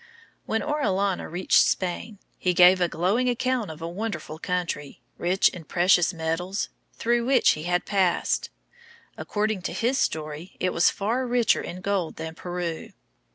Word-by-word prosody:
When 225 0 0
Orellana 200 -11 0
reached 180 +3 +3
Spain, 195 +4 -2 0.2
he 180 -1 +1
gave 180 +1 +7
a 175 - +4
glowing 195 +11 +1
account 245 -3 0
of 160 +1 -8
a - - -2
wonderful 170 -5 -5
country, 175 -6 -3 0.2
rich 185 +2 +3
in 175 - -10
precious 175 0 +3
metals, 175 +3 -2 0.3
through 235 +1 +1
which 255 0 +4
he 155 +1 -4
had 180 0 0
passed. 190 -4 +1 0.7
According 210 -2 -2
to - - -4
his 250 +4 0
story, 155 +3 -3
it 185 - 0
was 170 - +4
far 235 +6 -1
richer 240 -1 +2
in 180 +1 -7
gold 195 -4 -1
than 160 0 -6
Peru. 175 -1 -5
185 Hz, 155 wpm, -25 LUFS, 170-220 Hz, 0.7 s, gave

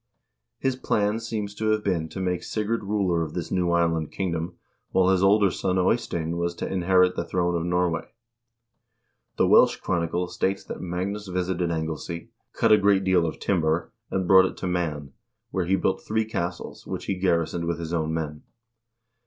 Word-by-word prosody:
His 135 -1 0
plan 105 -3 0
seems 110 -3 -4
to 110 +1 -4
have 110 -1 +1
been 85 -5 -1
to 95 - -7
make 90 -2 -1
Sigurd 110 +3 -2
ruler 95 -5 +1
of 80 -2 -4
this 85 -2 -4
new 90 -2 +1
island 85 -2 +1
kingdom, 85 -2 -3 0.3
while 95 0 +3
his 95 -1 +2
older 100 0 +5
son 95 +1 -1
Eystein 85 -4 0
was 85 0 -1
to - - -4
inherit 90 0 +3
the - - -1
throne 90 0 0
of 85 - -1
Norway. 90 -2 0 1.3
The - - +4
Welsh - - +6
chronicle 85 +1 -1
states 95 +2 -1
that - - -7
Magnus 95 +4 -3
visited 90 -1 -1
Anglesea, 80 +1 -4 0.2
cut 115 - +2
a 105 - +7
great 100 -1 +3
deal 90 -3 +3
of 80 - -4
timber, 85 -3 0 0.2
and 95 -2 -1
brought 95 0 +7
it - - -4
to 95 - -3
Man, 80 -6 -2 0.4
where 95 -2 -1
he 95 +3 +2
built 95 0 0
three 110 +2 0
castles, 90 -5 -5
which - - -5
he - - 0
garrisoned 85 -2 0
with 85 -1 -1
his 85 0 -5
own 80 -2 0
men. 75 -2 -3
90 Hz, 180 wpm, -25 LUFS, 85-95 Hz, 1.3 s, a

